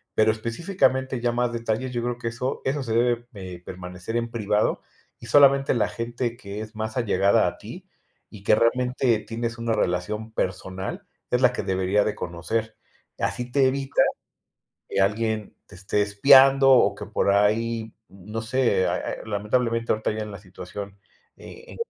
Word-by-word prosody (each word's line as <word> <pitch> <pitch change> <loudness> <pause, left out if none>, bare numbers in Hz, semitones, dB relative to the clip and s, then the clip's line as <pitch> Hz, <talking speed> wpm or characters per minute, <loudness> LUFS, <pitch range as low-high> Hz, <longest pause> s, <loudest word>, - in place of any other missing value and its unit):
pero 110 0 +4
específicamente 130 - -1
ya 120 0 +1
más 120 0 0
detalles, 115 +2 -2
yo 120 - -1
creo 120 0 -2
que 120 -1 -3
eso 125 +4 -4
eso 140 +2 0
se 115 -3 -3
debe, 120 0 +1
eh, 90 -3 -8
permanecer 90 +4 -6
en 115 0 -2
privado 105 -2 0 0.4
y - - -11
solamente 140 -1 +5
la 115 - +2
gente 120 0 -3
que 100 -1 -7
es 110 +1 -9
más 110 +2 -4
allegada 100 -4 +3
a - - -4
ti - - -10 0.4
y 100 - -13
que 105 - +4
realmente 125 0 +2
tienes 115 +2 -4
una 115 0 -2
relación 105 +4 -2
personal 95 -1 -4 0.2
es 125 - +2
la 125 -1 +5
que - - -3
debería 95 +2 +1
de 105 - -1
conocer. 110 +6 -3 0.4
Así 125 0 -2
te 135 0 +4
evita 135 +1 0 0.9
que - - +1
alguien 110 +1 -1
te - - -17
esté 95 +3 -1
espiando 135 +6 +6
o 130 - +5
que 105 - -7
por 100 -1 +1
ahí, 110 +2 +1 0.2
no 105 +4 -7
sé, 115 -5 +1
ah - - -1
ah - - -3
eh, - - -7
lamentablemente 115 +3 0
ahorita 110 0 0
ya 110 0 -4
en 105 - -8
la 100 - -8
situación. 100 +1 -9 0.4
Eh,. 465 +3 -12
115 Hz, 175 wpm, -24 LUFS, 100-125 Hz, 0.9 s, espiando